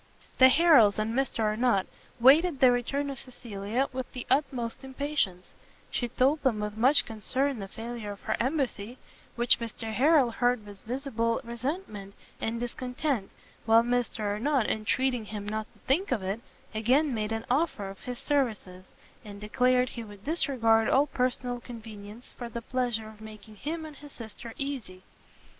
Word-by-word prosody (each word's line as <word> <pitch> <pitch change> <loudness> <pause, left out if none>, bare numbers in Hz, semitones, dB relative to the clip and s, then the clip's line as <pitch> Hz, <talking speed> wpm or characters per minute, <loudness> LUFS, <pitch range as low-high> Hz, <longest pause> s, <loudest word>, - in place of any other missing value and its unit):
The 260 0 +9
Harrels 275 -9 +6
and 215 +1 -1
Mr 265 -2 0
Arnott 215 -2 +2 0.3
waited 285 +5 +6
the 260 -3 +7
return 275 +4 -1
of 270 - -5
Cecilia 235 0 -3
with 260 -1 -5
the 250 - -6
utmost 260 -3 0
impatience; 265 -9 -2 0.4
she 245 - -1
told 270 +6 +2
them 250 -6 +1
with 210 0 -3
much 260 +7 +5
concern 255 +4 -1
the 195 - -5
failure 225 0 -6
of 200 - -15
her - - -1
embassy, 255 -4 -1 0.4
which 240 0 +4
Mr 225 -1 -5
Harrel 275 0 +4
heard 245 -2 +1
with 205 -1 -11
visible 230 -2 -1
resentment 235 - -5 0.2
and 230 +1 -2
discontent, 250 -1 -2 0.4
while 225 +1 +6
Mr 240 -2 -1
Arnott, 220 +5 +1
entreating 245 +2 0
him 205 -1 -6
not 215 +1 -3
to - - -26
think 335 +10 +1
of 225 -7 0
it, 195 +4 -2 0.3
again 255 +7 +2
made 215 -1 -2
an 225 0 -3
offer 255 -7 0
of 195 0 -9
his 250 -1 -6
services, 215 -11 -1 0.4
and 205 -2 -10
declared 250 +4 +2
he 235 - -7
would 205 -2 -12
disregard 235 -8 +2
all 275 +2 +4
personal 250 -2 -1
convenience 225 -1 -10
for 240 -1 -5
the 235 0 -6
pleasure 240 -4 -1
of 215 0 -13
making 215 0 -11
him 315 +8 -4
and 305 -2 -10
his 290 0 -12
sister 230 0 -9
easy. 245 -10 -5
240 Hz, 160 wpm, -28 LUFS, 215-265 Hz, 0.4 s, The